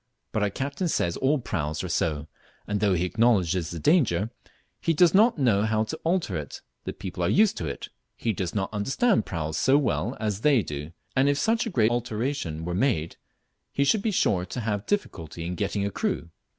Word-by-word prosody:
But 110 Hz, -, -1 dB
our 105 Hz, -, +2 dB
captain 140 Hz, -, -3 dB
says 85 Hz, -, 0 dB
all 140 Hz, +3 st, +2 dB
praus 80 Hz, -, -3 dB
are -, -, -3 dB
so; 75 Hz, -3 st, -1 dB, 0.4 s
and 105 Hz, 0 st, -1 dB
though 100 Hz, -2 st, +3 dB
he 90 Hz, +1 st, +1 dB
acknowledges 90 Hz, -4 st, +2 dB
the 85 Hz, -, -5 dB
danger, 115 Hz, -, +2 dB, 0.5 s
"he 165 Hz, -, +1 dB
does 170 Hz, +1 st, +5 dB
not 220 Hz, +3 st, +5 dB
know 120 Hz, -8 st, +3 dB
how 110 Hz, 0 st, +1 dB
to 110 Hz, -, -4 dB
alter 175 Hz, +2 st, 0 dB
it 75 Hz, -2 st, -7 dB, 0.2 s
the -, -, -2 dB
people 95 Hz, -2 st, -6 dB
are 85 Hz, -, +2 dB
used 210 Hz, +1 st, +4 dB
to 80 Hz, -, -3 dB
it; 70 Hz, -, -6 dB, 0.3 s
he 115 Hz, -, -1 dB
does 90 Hz, -1 st, -3 dB
not 95 Hz, +1 st, -2 dB
understand 135 Hz, -, +1 dB
praus 80 Hz, -2 st, -3 dB
so 135 Hz, +2 st, +4 dB
well 145 Hz, -, 0 dB
as 105 Hz, -2 st, -2 dB
they 140 Hz, -6 st, +4 dB
do, 75 Hz, +2 st, -6 dB, 0.2 s
and 135 Hz, +2 st, +4 dB
if 145 Hz, -, +2 dB
such 225 Hz, +8 st, +1 dB
a -, -, -1 dB
great 115 Hz, -, +2 dB
alteration 115 Hz, -, -2 dB
were 90 Hz, -, -2 dB
made, 95 Hz, -, 0 dB, 0.5 s
he 140 Hz, -, +1 dB
should 195 Hz, +9 st, +3 dB
be 220 Hz, -, 0 dB
sure 95 Hz, -, +2 dB
to 120 Hz, +7 st, -5 dB
have 105 Hz, -2 st, -2 dB
difficulty 85 Hz, -, -3 dB
in 90 Hz, -, -3 dB
getting 100 Hz, +1 st, -1 dB
a 100 Hz, -, -2 dB
crew!" 85 Hz, -2 st, -2 dB
105 Hz, 205 wpm, -26 LUFS, 85-140 Hz, 0.5 s, does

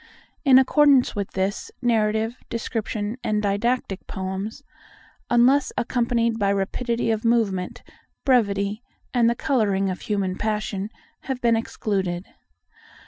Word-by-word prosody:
In 270 Hz, -3 st, +7 dB
accordance 270 Hz, 0 st, +4 dB
with 200 Hz, -2 st, -2 dB
this, 190 Hz, +1 st, -2 dB
narrative, 220 Hz, -1 st, +1 dB
descriptive, 220 Hz, -1 st, -3 dB
and 210 Hz, -1 st, +1 dB
didactic 205 Hz, 0 st, -1 dB
poems—unless 240 Hz, +5 st, -1 dB
accompanied 235 Hz, -1 st, 0 dB
by 200 Hz, -1 st, +2 dB
rapidity 230 Hz, +4 st, -1 dB
of 220 Hz, -1 st, -1 dB
movement, 215 Hz, -6 st, 0 dB, 0.4 s
brevity, 205 Hz, -5 st, +2 dB, 0.3 s
and 235 Hz, -2 st, +4 dB
the 235 Hz, -, +1 dB
colouring 200 Hz, -7 st, +1 dB
of 185 Hz, -, -6 dB
human 195 Hz, -3 st, -1 dB
passion—have 215 Hz, +4 st, -4 dB
been 235 Hz, -2 st, +3 dB
excluded. 195 Hz, -5 st, -2 dB
220 Hz, 105 wpm, -24 LUFS, 200-240 Hz, 0.4 s, In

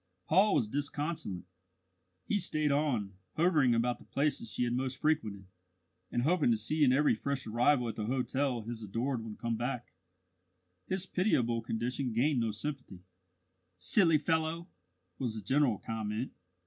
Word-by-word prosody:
Paul 195 Hz, +6 st, +4 dB
was 115 Hz, -, +2 dB
disconsolate. 145 Hz, -, -2 dB, 0.8 s
He 205 Hz, -, +1 dB
stayed 155 Hz, -5 st, 0 dB
on, 130 Hz, -9 st, 0 dB, 0.2 s
hovering 155 Hz, -7 st, +4 dB
about 120 Hz, +1 st, 0 dB
the -, -, -14 dB
places 140 Hz, -6 st, -1 dB
she 95 Hz, -, -1 dB
had 120 Hz, -1 st, 0 dB
most 130 Hz, +1 st, -2 dB
frequented, 110 Hz, -11 st, 0 dB, 0.7 s
and 120 Hz, -, 0 dB
hoping 160 Hz, -2 st, +3 dB
to 115 Hz, -, +3 dB
see 150 Hz, +8 st, 0 dB
in 130 Hz, -, +6 dB
every 145 Hz, +3 st, +4 dB
fresh 140 Hz, -1 st, -3 dB
arrival 120 Hz, +3 st, +2 dB
at 115 Hz, -, -2 dB
the 105 Hz, -1 st, -2 dB
hotel 130 Hz, 0 st, 0 dB
his 115 Hz, 0 st, -6 dB
adored 115 Hz, +4 st, -2 dB
one 110 Hz, -2 st, -7 dB
come 115 Hz, +1 st, -2 dB
back. 120 Hz, 0 st, -4 dB, 0.9 s
His 190 Hz, 0 st, -2 dB
pitiable 125 Hz, -, +1 dB
condition 120 Hz, +3 st, -2 dB
gained 130 Hz, +4 st, +2 dB
no 115 Hz, -1 st, +1 dB
sympathy. 110 Hz, -5 st, -5 dB, 0.7 s
"Silly 160 Hz, -, +5 dB
fellow!" 160 Hz, +3 st, -1 dB, 0.5 s
was 120 Hz, -4 st, -2 dB
the 110 Hz, -, -6 dB
general 130 Hz, -2 st, +3 dB
comment. 110 Hz, +3 st, -3 dB
125 Hz, 150 wpm, -32 LUFS, 115-150 Hz, 0.9 s, in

